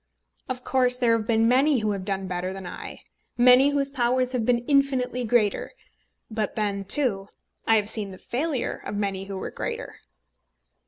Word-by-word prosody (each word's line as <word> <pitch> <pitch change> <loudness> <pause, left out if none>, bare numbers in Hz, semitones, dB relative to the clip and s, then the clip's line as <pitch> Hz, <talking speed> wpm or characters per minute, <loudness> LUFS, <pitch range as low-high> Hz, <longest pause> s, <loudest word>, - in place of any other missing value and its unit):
Of 250 -1 -4
course 250 -1 +2
there 235 -2 +3
have 220 -1 -3
been 225 -1 +3
many 270 +4 +4
who 215 -2 0
have 195 -2 -4
done 195 -1 -2
better 180 0 -3
than 190 -1 -8
I, - - -8 0.3
many 250 +3 +6
whose 280 -1 -1
powers 255 -1 +1
have 245 -4 -2
been 240 -1 +1
infinitely 260 -3 +1
greater. 220 -3 +1 0.6
But 215 -2 -2
then, 200 -2 -2
too, 200 -4 +1 0.4
I 225 - +5
have 210 -2 +2
seen 215 -2 0
the 190 - -10
failure 270 - -3
of - - -5
many 195 -2 -2
who 195 -1 -6
were - - -5
greater. - - -5
235 Hz, 175 wpm, -25 LUFS, 200-255 Hz, 0.6 s, many